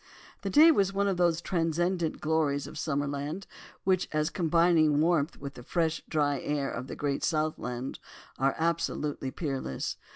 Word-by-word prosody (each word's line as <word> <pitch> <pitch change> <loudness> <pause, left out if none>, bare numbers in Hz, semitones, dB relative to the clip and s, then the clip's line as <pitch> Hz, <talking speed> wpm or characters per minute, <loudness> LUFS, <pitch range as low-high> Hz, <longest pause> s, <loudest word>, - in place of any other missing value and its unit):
The - - -3
day 315 +3 +8
was 200 -9 +2
one 200 +1 +1
of 195 -2 0
those 170 -2 +2
transcendant 170 0 0
glories 155 -3 +1
of - - -9
a - - -9
summer 145 -2 -1
land, 145 +7 -4 0.4
which, 185 -2 +1
as 155 +1 0
combining 165 -2 +3
warmth 160 -1 +2
with 140 0 -6
the 125 - -11
fresh 165 +4 -1
dry 145 -3 +1
air 145 -1 -2
of 125 +2 -5
the - - -6
Great 140 -1 -2
South 155 -1 0
Land, 125 +1 -5 0.4
are 135 +1 +2
absolutely 160 -4 -1
peerless. 135 - -3
155 Hz, 170 wpm, -29 LUFS, 140-170 Hz, 0.4 s, day